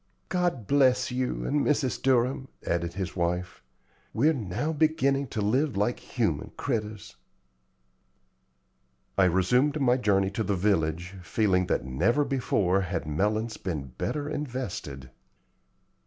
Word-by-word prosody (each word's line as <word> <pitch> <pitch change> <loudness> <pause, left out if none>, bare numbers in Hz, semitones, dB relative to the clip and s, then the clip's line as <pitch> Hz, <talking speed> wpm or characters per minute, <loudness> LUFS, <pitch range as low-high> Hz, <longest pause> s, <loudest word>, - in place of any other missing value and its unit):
"God 175 - 0
bless 130 -1 +3
you 125 0 -2
and 145 0 +1
Mrs. 140 -3 0
Durham!" 130 0 +2 0.2
added 85 0 -1
his 95 -1 -4
wife 90 0 -2 0.5
"We're 150 +8 +4
now 130 - -2
beginning 140 -3 +2
to 110 - -3
live 125 +3 +1
like 105 +4 0
human - - -2
critters." 110 -7 -3 2.0
I 95 - +4
resumed 125 - +2
my 125 -2 +3
journey 100 -5 +2
to 110 +3 -2
the 100 -1 0
village, 90 -2 0
feeling 90 0 +1
that - - 0
never 100 - +1
before 100 -8 +1
had 90 -3 -3
melons 105 +9 -1
been 75 -8 -4
better 145 -1 -2
invested. 120 - -5
110 Hz, 125 wpm, -27 LUFS, 90-135 Hz, 2.0 s, We're